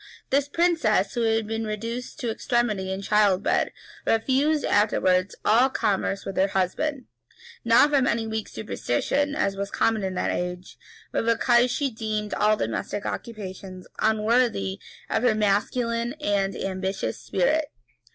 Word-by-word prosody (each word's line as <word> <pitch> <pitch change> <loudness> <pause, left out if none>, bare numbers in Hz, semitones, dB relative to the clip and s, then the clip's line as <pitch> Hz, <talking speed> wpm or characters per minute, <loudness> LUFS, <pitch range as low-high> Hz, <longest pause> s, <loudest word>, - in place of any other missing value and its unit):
This 280 +1 +2
princess, 300 - +2
who 240 - -1
had 225 -1 +1
been 225 +1 -3
reduced 230 +6 -5
to 240 -3 -1
extremity 220 -5 -1
in 190 +1 -4
childbed, 205 -2 +2 0.3
refused 275 +7 +2
afterwards 190 -3 +2
all 240 +5 +5
commerce 200 -5 -1
with 195 - -5
her 190 - +4
husband; 240 +9 -1 0.6
not 235 +6 +5
from 270 -3 +3
any 230 -1 0
weak 220 -1 -3
superstition, 280 - -1
as 200 -9 0
was 200 0 -3
common 220 -1 +1
in 190 -1 -2
that - - 0
age, 180 0 -5 0.3
but - - 0
because 240 +2 +3
she 275 +2 -1
deemed 215 -1 -3
all 215 +1 +3
domestic 115 - -3
occupations 190 -4 -6
unworthy 220 - +1 0.3
of 220 - 0
her 240 -3 +3
masculine 230 +3 0
and 195 -1 0
ambitious 190 0 -3
spirit. 305 - +1
220 Hz, 140 wpm, -25 LUFS, 195-240 Hz, 0.6 s, all